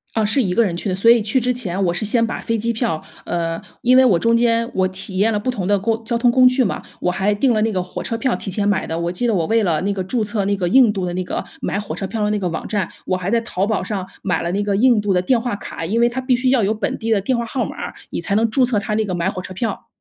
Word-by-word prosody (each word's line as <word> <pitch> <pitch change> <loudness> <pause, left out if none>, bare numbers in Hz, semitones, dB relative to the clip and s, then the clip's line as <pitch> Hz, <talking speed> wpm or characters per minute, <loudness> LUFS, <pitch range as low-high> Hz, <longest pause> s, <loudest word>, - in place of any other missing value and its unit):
啊， 220 -1 +2
是 215 +7 +2
一 185 -7 0
个 235 - +4
人 175 -5 -2
去 190 - -3
的。 185 - 0
所 200 +5 +4
以 235 0 +6
去 215 +5 +1
之 250 +1 +1
前 200 -6 -2
我 170 - +1
是 175 - -2
先 230 +2 +3
把 230 - -3
飞 230 - -2
机 230 +2 -1
票 225 -9 -2 0.2
呃， 165 -1 -2 0.2
因 250 +1 +5
为 260 - +7
我 220 -8 +4
中 230 +3 +3
间 230 0 +2
我 185 0 +2
体 190 0 -7
验 220 +3 +3
了 210 - 0
不 255 - -1
同 205 -8 -4
的 205 +1 +3
工 225 +3 -1
交 235 +1 -1
通 240 +1 +3
工 255 +1 +5
具 255 +1 +2
嘛， 200 - -1 0.2
我 180 - +1
还 190 +3 +1
订 245 +5 +2
了 215 - +1
那 225 - +1
个 185 -2 -1
火 180 - -7
车 230 - -3
票 250 +2 0
提 - - -8
前 200 +2 -1
买 190 -2 +1
的。 160 - -3
我 170 0 -1
记 240 +7 -1
得 230 - +2
我 170 -4 0
为 225 +3 +2
了 165 -5 +1
那 200 +2 -1
个 195 -1 -2
注 225 +5 -1
册 205 -1 -1
那 200 +1 +1
个 180 -2 -1
印 245 0 +5
度 195 -3 -3
的 175 - -2
那 185 0 -2
个 - - -4 0.2
买 - - -2
火 205 - -6
车 195 - -3
票 220 +2 -3
的 210 - +1
那 210 - 0
个 185 -3 -1
网 165 - -4
站， 200 -5 -1 0.2
我 185 - +1
还 185 0 -4
在 235 - +2
淘 200 -4 -2
宝 220 -1 0
上 185 -1 -4
买 185 - 0
了 170 +1 -2
那 200 +2 0
个 200 -1 0
印 240 0 +4
度 205 -1 0
的 180 - +3
电 235 +7 +2
话 235 -3 -2
卡， 195 -4 -7
因 215 +8 0
为 240 - +5
它 245 +2 -3
必 255 -1 +2
须 255 +1 +1
要 255 -4 +3
有 200 - +2
本 220 - -2
地 225 - -3
的 215 -3 +3
电 255 +6 0
话 235 - -2
号 245 +2 -2
码 - - -6
儿， - - -6 0.2
你 - - -3
才 200 - -2
能 225 +1 +3
注 255 +4 +3
册 240 -4 +1
它 205 +1 -2
那 220 +1 +1
个 190 -3 -3
买 170 +1 0
火 185 -1 -4
车 185 - -8
票。 200 +2 -4
210 Hz, 360 characters per minute, -20 LUFS, 190-235 Hz, 0.2 s, 为